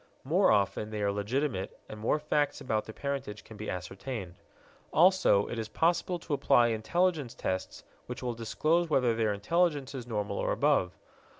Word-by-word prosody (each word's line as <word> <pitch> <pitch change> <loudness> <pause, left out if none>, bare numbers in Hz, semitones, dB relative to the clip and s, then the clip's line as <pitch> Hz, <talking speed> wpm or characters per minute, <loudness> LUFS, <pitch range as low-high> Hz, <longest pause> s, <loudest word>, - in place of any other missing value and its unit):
More 175 +9 +3
often 100 0 +1
they 105 -1 -3
are 100 - +2
legitimate 105 0 -2
and 110 - -9
more 110 +7 +1
facts 150 -1 0
about 110 -4 -1
their - - -7
parentage 135 -7 -4
can 110 - -12
be 105 +1 -6
ascertained; 95 +2 -5 0.6
also, 180 - +5
it 120 - -4
is 110 - -3
possible 170 +5 +1
to 165 -2 -5
apply 135 -4 +4
intelligence 145 +4 0
tests 95 0 -4 0.2
which - - -6
will 120 -1 -1
disclose 155 +9 0
whether 125 -6 +3
their 110 -2 +1
intelligence 145 - 0
is 125 -3 -6
normal 105 -3 -2
or - - 0
above. 130 -8 +1
120 Hz, 170 wpm, -30 LUFS, 105-150 Hz, 0.6 s, also